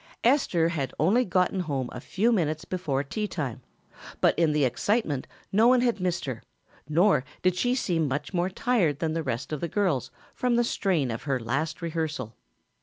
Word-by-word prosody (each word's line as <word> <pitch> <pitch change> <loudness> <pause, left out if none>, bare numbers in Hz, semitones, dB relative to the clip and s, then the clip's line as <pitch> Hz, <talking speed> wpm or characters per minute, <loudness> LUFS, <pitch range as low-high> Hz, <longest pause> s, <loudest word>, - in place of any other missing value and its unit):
Esther 225 - +3
had 140 -7 -3
only 200 - +4
gotten 185 -2 +1
home 140 -7 -2
a 125 - -7
few 220 - +1
minutes 155 -7 0
before 150 -7 -1
tea 210 +9 -3
time, 140 - -4 0.6
but - - +4
in 165 -2 +3
the 150 -2 +2
excitement 145 - 0 0.2
no 220 +4 +5
one 250 0 +5
had 240 -4 +1
missed 180 -2 -1
her, 130 -5 -4 0.5
nor 170 -1 +4 0.2
did 185 -1 +3
she 245 +7 +1
seem 170 - 0
much 140 +7 -3
more 180 +1 +1
tired 190 - +1
than 160 -1 -1
the 165 - -1
rest 130 0 -3
of 150 - -3
the 170 - -1
girls 175 - 0 0.2
from 250 -1 +1
the 240 - +3
strain 175 - 0
of 115 - -4
her 135 -2 +1
last 135 +9 -2
rehearsal. 155 -8 -3
165 Hz, 185 wpm, -27 LUFS, 140-200 Hz, 0.6 s, no